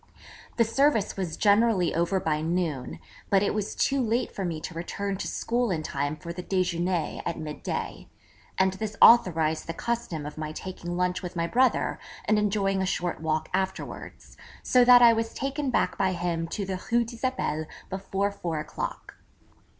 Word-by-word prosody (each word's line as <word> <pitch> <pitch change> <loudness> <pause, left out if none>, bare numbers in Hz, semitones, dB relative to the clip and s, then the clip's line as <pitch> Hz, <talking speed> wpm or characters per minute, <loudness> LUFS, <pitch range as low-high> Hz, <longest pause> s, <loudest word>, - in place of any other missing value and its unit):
The 230 - +5
service 230 -2 +2
was 180 -5 -3
generally 205 -3 +3
over 170 +4 +1
by 155 -3 -1
noon; 160 -5 -2 0.3
but 195 0 +4
it - - +1
was 210 -1 -3
too 275 -1 +1
late 235 +1 0
for 195 - -4
me 170 -3 -2
to 180 - -7
return 195 +4 -3
to - - -4
school 240 0 -1
in 165 -4 -1
time 145 0 -2
for 170 +2 -7
the 180 - -6
déjeuner 180 -2 -1
at 170 - -3
mid 155 -2 -6
day, - - -4 0.5
and 190 0 +3
this 210 +1 -5
authorised 160 -9 +5
the 165 - -4
custom 205 -11 -3
of 150 +1 -7
my 155 0 -4
taking 175 0 -6
lunch 180 0 0
with 180 0 -6
my 170 -1 0
brother 250 +8 +2 0.3
and 215 -1 +3
enjoying 195 -2 +1
a - - +1
short 175 -3 -2
walk 155 0 -1
afterwards; 190 0 -4 0.3
so 250 -1 +5
that 245 0 +8
I 235 -1 +8
was 225 0 -2
taken 275 +1 -2
back - - 0
by 190 -1 +2
him 170 -1 -2
to 200 +4 -3
the 185 -1 -4
Rue 235 0 +3
d'Isabelle 230 - -2 0.2
before 195 +1 -1
four 170 -5 -4
o'clock. 150 - -6
185 Hz, 180 wpm, -27 LUFS, 165-220 Hz, 0.5 s, that